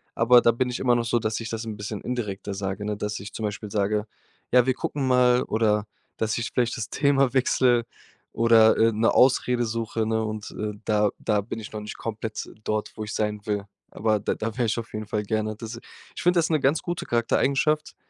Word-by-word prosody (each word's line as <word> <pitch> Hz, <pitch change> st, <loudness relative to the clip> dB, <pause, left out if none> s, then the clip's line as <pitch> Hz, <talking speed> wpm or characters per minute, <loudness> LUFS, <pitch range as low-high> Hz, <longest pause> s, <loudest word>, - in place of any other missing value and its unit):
Aber 120 Hz, +1 st, +6 dB
da 115 Hz, -, +5 dB
bin 125 Hz, +2 st, -1 dB
ich 120 Hz, -, -4 dB
immer 125 Hz, -2 st, +3 dB
noch 120 Hz, -1 st, 0 dB
so, 120 Hz, +1 st, +1 dB
dass 110 Hz, -1 st, -2 dB
ich 115 Hz, 0 st, -5 dB
das 115 Hz, 0 st, -4 dB
'n 110 Hz, -2 st, -5 dB
bisschen 105 Hz, 0 st, -5 dB
indirekter 105 Hz, -5 st, -4 dB
sage, 95 Hz, +1 st, -3 dB
ne, 105 Hz, -1 st, -2 dB
dass 105 Hz, 0 st, -3 dB
ich 100 Hz, +2 st, -9 dB
zum 110 Hz, -, -6 dB
Beispiel 105 Hz, 0 st, -4 dB
sage: 105 Hz, +1 st, 0 dB, 0.4 s
„Ja, 125 Hz, -1 st, +5 dB
wir 130 Hz, -, +3 dB
gucken 140 Hz, +1 st, -3 dB
mal“, 125 Hz, -1 st, +4 dB
oder, 105 Hz, -2 st, +1 dB, 0.3 s
dass 110 Hz, 0 st, -1 dB
ich 115 Hz, -, -3 dB
vielleicht 120 Hz, -1 st, +1 dB
das 110 Hz, -, -4 dB
Thema 140 Hz, -3 st, +2 dB
wechsle 125 Hz, -2 st, +3 dB, 0.5 s
oder, 115 Hz, -1 st, +5 dB
äh, 115 Hz, +1 st, +4 dB
'ne 110 Hz, +2 st, +2 dB
Ausrede 125 Hz, -1 st, +3 dB
suche, 115 Hz, 0 st, -2 dB
ne, 110 Hz, 0 st, 0 dB
und, 110 Hz, -1 st, -5 dB
äh, 105 Hz, 0 st, -4 dB
da 105 Hz, -2 st, +2 dB
da 105 Hz, -2 st, +1 dB
bin 115 Hz, +2 st, -6 dB
ich 110 Hz, -, -9 dB
noch 110 Hz, -, -4 dB
nicht 105 Hz, -, -8 dB
komplett 110 Hz, -1 st, -5 dB, 0.2 s
dort, 110 Hz, 0 st, -2 dB
wo 110 Hz, -, -4 dB
ich 105 Hz, -, -6 dB
sein 105 Hz, -1 st, -1 dB
will. 105 Hz, -2 st, -2 dB, 0.3 s
Aber 110 Hz, -1 st, +1 dB
da 100 Hz, -, -1 dB
da 110 Hz, 0 st, -4 dB
wäre 125 Hz, -, +2 dB
ich 110 Hz, -, 0 dB
auf 115 Hz, -, -8 dB
jeden 110 Hz, 0 st, -4 dB
Fall 105 Hz, 0 st, -1 dB
gerne. 110 Hz, +1 st, -2 dB
Das 115 Hz, +1 st, -7 dB, 0.4 s
ich -, -, -6 dB
finde 180 Hz, 0 st, +4 dB
das 165 Hz, -, +1 dB
'ne 155 Hz, -, +3 dB
ganz 145 Hz, +4 st, +2 dB
gute 175 Hz, -1 st, -4 dB
Charaktereigenschaft, 140 Hz, +6 st, +1 dB
110 Hz, 225 wpm, -25 LUFS, 105-120 Hz, 0.5 s, Aber